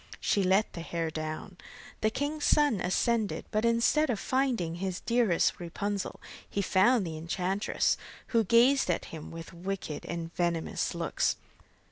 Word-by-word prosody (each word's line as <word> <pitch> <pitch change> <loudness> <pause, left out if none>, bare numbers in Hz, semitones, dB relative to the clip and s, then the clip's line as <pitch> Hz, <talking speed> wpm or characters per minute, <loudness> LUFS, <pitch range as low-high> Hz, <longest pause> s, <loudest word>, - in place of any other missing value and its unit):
she 200 - +1
let 190 +3 +2
the 170 - -6
hair 165 -1 -3
down. 155 +4 -5 0.4
The 215 - +3
king's 290 +6 -3
son 290 -9 +4
ascended, 215 +4 0
but 215 +1 +1
instead 235 +6 +3
of 225 -5 0
finding 245 -11 0
his 185 0 -3
dearest 230 -7 +2
Rapunzel, 200 +3 -3 0.3
he 200 - -1
found 200 +4 +4
the 160 -2 -5
enchantress, 180 +4 0 0.3
who 230 -2 +3
gazed 235 +4 +4
at 175 - 0
him 155 -2 -7
with 165 0 -9
wicked 175 -4 -5
and 170 -1 -5
venomous 170 -2 -1
looks. - - 0
195 Hz, 145 wpm, -29 LUFS, 170-230 Hz, 0.4 s, son